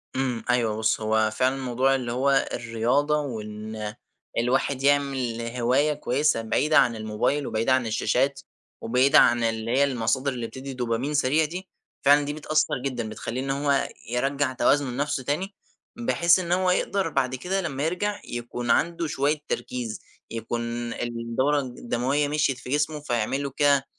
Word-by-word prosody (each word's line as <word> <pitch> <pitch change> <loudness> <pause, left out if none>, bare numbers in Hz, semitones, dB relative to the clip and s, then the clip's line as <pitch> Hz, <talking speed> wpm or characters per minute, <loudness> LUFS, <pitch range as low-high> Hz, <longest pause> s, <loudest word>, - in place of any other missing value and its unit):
إمم، 130 -3 -1
أيوه 115 -3 +2
بُص، 110 0 +1
هو 110 0 +2
فعلًا 130 +3 +2
الموضوع 130 0 +1
اللي 125 -3 -3
هو 135 +3 +2
الرياضة، 120 +6 +1
وإن 105 -4 -6 0.4
الواحد 130 +3 +1
يعمل 135 -4 +1
هواية 130 +5 +2
كويسة 145 -3 +1
بعيدة 145 +7 +2
عن 115 - +4
الموبايل، 110 +6 -1
وبعيدة 115 +4 +1
عن 130 -3 +1
الشاشات، 130 +5 +1 0.4
وبعيدة 130 +5 +4
عن 120 0 +4
اللي 115 0 -1
هي 135 +3 +4
المصادر 130 +1 0
اللي 120 -2 -4
بتدي 135 +2 -8
دوبامين 125 +3 -2
سريع 145 +2 +3
دي، 180 +5 -6 0.4
فعلًا 145 +1 +7
دي 145 - -3
بتأثر 155 0 0
جدًا، 120 -5 -2
بتخلّيه 115 +3 -4
إن 135 - -4
هو 140 0 +1 0.2
يرجَّع 135 +2 0
توازنه 140 +1 +2
لنفسه 140 +1 -2
تاني، 170 +10 -2 0.4
بحيث 175 -7 +3
إن 175 -2 -4
هو 180 0 +3
يقدر 195 +1 0
بعد 130 -1 0
كده 185 +9 -2
لمّا 145 -6 -3
يرجع 205 +5 -1
يكون 120 0 -5
عنده 170 +4 +1
شوية 150 +1 0
تركيز، 120 -4 -3 0.3
يكون 115 +1 -3
الدورة 120 +5 -1
الدموية 130 +2 -1
مشيت 145 -3 +1
في 125 - -10
جسمُه، 150 +2 0
فيعمل 135 -1 -1
له 140 - -2
كده 140 -2 +4
130 Hz, 155 wpm, -25 LUFS, 120-145 Hz, 0.4 s, فعلًا